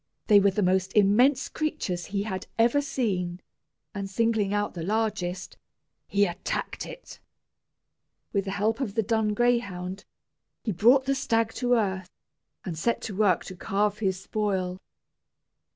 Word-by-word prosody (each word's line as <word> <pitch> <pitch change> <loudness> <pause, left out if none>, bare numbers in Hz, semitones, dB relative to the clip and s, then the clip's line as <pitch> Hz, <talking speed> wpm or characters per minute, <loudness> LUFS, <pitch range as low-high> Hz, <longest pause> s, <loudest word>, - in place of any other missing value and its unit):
They 210 -2 +7
were 200 0 +4
the 200 +2 0
most 185 +1 +1
immense 245 +7 +4
creatures 300 - -3
he 200 0 -2
had 190 -3 -5
ever 235 +5 +4
seen; 185 -11 -2 0.5
and 200 -1 -4
singling 220 -1 +1
out 205 0 -1
the 170 - -6
largest, 195 -2 -2 0.5
he 200 0 +3
attacked 175 0 -4
it. - - -11 1.1
With 200 -2 0
the - - -3
help 220 +3 +1
of 225 -7 -3
the 225 - +2
dun 220 -1 +1
greyhound, 200 -6 0 0.6
he 220 - -1
brought 240 +9 +5
the 275 - +2
stag 225 -4 0
to 245 0 +3
earth, 190 -4 -1 0.6
and 175 - -4
set 230 +9 0
to 205 - -5
work 195 -3 +2
to 185 - -8
carve 205 +3 0
his 190 -3 0
spoil. 190 -3 -2
205 Hz, 150 wpm, -27 LUFS, 190-225 Hz, 1.1 s, They